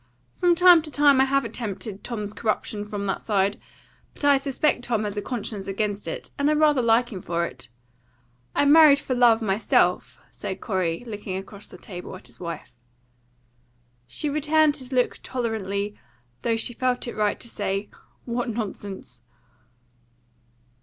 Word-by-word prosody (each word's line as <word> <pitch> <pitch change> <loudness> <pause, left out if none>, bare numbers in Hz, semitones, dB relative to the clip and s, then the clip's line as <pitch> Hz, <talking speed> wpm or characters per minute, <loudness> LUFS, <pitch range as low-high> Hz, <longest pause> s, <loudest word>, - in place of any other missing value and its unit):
"From 355 -1 +4
time 355 -1 +7
to 310 - -8
time 285 -2 +5
I - - +5
have 275 +1 +1
attempted 210 -2 -5
Tom's 210 -4 -4
corruption 215 -1 -2
from 205 -1 -4
that 195 - -2
side, 200 -1 +1 0.6
but - - -4
I 285 -1 +6
suspect 275 -1 0
Tom 230 -3 0
has 205 -1 -3
a 205 - -2
conscience 210 -4 -4
against 200 -1 -2
it, 160 - -6
and 285 +1 +3
I - - +4
rather 300 -3 +4
like 235 +1 +2
him 185 - -6
for 170 0 -1
it. 125 -6 -8 0.9
I - - +3
married 300 -1 +8
for 270 - -3
love 240 -2 +4
myself," 205 +1 +1
said - - -6
Corey, 185 -4 -1
looking 205 -4 -5
across 200 +1 -9
the - - -12
table 180 -3 -8
at - - -13
his 120 -1 -12
wife. 170 -6 -7 1.3
She 125 - -2
returned 305 +1 +2
his 260 -1 -9
look 250 -1 +1
tolerantly, 210 -5 -2 0.5
though 230 -1 +1
she 240 +2 -2
felt 250 +1 -1
it - - -5
right 210 -1 0
to - - -6
say, 200 -2 -3 0.4
"What 240 0 -2
nonsense!" 200 - -6
225 Hz, 160 wpm, -25 LUFS, 200-270 Hz, 1.3 s, married